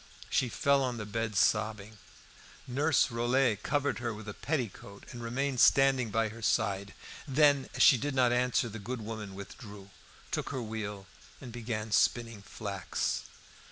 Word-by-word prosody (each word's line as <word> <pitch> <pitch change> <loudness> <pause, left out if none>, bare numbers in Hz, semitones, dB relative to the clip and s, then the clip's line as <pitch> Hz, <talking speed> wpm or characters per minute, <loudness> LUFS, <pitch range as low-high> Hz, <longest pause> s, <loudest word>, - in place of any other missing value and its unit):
She 125 - +2
fell 140 +4 +2
on 125 -2 -1
the 105 - -5
bed 110 +1 -3
sobbing. 105 +1 +1 0.7
Nurse 140 +3 +2
Rollet 120 -2 +1
covered 145 -1 0
her 120 -2 -3
with 110 +1 -10
a 105 - -5
petticoat 115 - -4
and 120 - -8
remained 130 +3 -2
standing 135 -3 +5
by 110 +1 +1
her 115 +2 -11
side. 100 -3 0 0.3
Then, 145 0 +3
as - - +4
she 130 - +7
did 145 +1 -2
not 125 -2 +4
answer, 125 0 +1
the 115 0 -7
good 120 +4 -5
woman 105 -3 -6
withdrew, 100 0 -10 0.4
took - - -2
her 130 -3 -3
wheel 105 -3 -5 0.3
and 125 - -9
began 115 -2 -4
spinning 115 -1 +1
flax. - - -3
115 Hz, 155 wpm, -31 LUFS, 105-130 Hz, 0.7 s, she